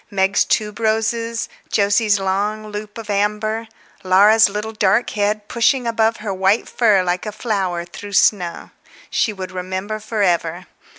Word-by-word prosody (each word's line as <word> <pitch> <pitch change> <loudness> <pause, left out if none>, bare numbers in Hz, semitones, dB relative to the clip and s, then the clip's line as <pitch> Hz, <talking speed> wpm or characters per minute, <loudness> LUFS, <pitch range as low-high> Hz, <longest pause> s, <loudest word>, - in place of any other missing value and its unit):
Meg's 195 -1 +2
tuberoses, 225 +2 -1 0.3
Jose's 205 0 +3
long 205 +3 -2
loop 210 +1 -7
of 225 -2 -8
amber, 210 +2 -1 0.4
Laura's 205 +4 +5
little 210 +2 -4
dark 215 +2 +1
head, 210 0 -1
pushing 245 +2 +1
above 225 -1 +1
her 210 -2 -4
white 195 +4 +1
fur 210 -6 +3
like 180 +3 -2
a - - -3
flower 195 -6 -2
through 200 +3 -10
snow. 180 -3 +1 0.4
She 220 - +1
would 190 -2 -7
remember 185 +3 -4
for 215 -1 -2
ever. 175 -1 0
210 Hz, 140 wpm, -19 LUFS, 190-220 Hz, 0.4 s, Laura's